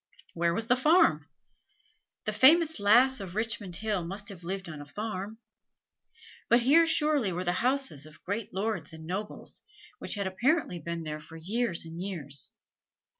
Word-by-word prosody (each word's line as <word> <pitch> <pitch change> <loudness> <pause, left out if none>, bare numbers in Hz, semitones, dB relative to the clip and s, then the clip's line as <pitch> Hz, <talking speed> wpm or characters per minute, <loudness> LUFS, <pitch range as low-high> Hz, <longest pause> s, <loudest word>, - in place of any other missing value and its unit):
Where 170 0 +1
was 225 - -2
the 245 - +3
farm? 305 +8 +3 1.0
The - - -1
famous 320 +1 +5
Lass 245 +6 +5
of 190 -2 -7
Richmond 215 -5 -2
Hill 205 -1 -2
must 195 +4 -4
have 185 -4 -10
lived 190 +2 -4
on 155 -3 -8
a - - -9
farm; 210 +4 -5 1.1
but 235 +1 +5
here 315 +7 +5
surely 300 -9 +3
were 180 +1 -3
the 175 - +1
houses 255 - +1
of 155 - -17
great 205 +3 -4
lords 200 -2 -3
and 160 0 -10
nobles, 195 +5 -5 0.4
which - - -1
had 200 -1 -2
apparently 230 - 0
been 170 +1 -5
there 155 -1 -5
for 165 +2 -11
years 195 +1 -1
and 165 +1 -8
years. 155 -8 -3
200 Hz, 165 wpm, -29 LUFS, 170-240 Hz, 1.1 s, famous